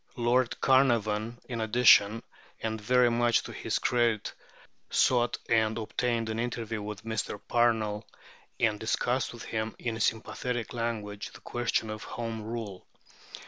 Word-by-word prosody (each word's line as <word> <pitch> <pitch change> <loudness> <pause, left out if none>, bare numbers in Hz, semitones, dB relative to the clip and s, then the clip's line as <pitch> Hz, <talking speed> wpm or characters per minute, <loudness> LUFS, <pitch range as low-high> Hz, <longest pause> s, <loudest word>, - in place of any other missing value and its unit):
Lord 120 0 +1
Carnarvon, 115 -4 +2
in 120 -3 -3
addition, 110 -1 +5 0.4
and 110 -1 -3
very 125 +2 +4
much 120 0 +2
to - - -8
his - - -2
credit, 120 -3 +1 0.6
sought 120 -1 +3
and 110 -1 +2
obtained 115 +1 -1
an 110 0 -3
interview 115 -2 -3
with 105 0 -6
Mr. 110 -2 -3
Parnell, 110 -3 +1 0.5
and 110 -3 +2
discussed 125 +3 0
with 120 - -9
him, 110 0 -3
in 115 -2 -3
sympathetic 115 +2 -2
language, 110 -4 -4
the - - -13
question 120 -2 -1
of 110 0 -6
Home 115 -2 -5
Rule. 110 -4 -6
115 Hz, 135 wpm, -29 LUFS, 110-120 Hz, 0.6 s, addition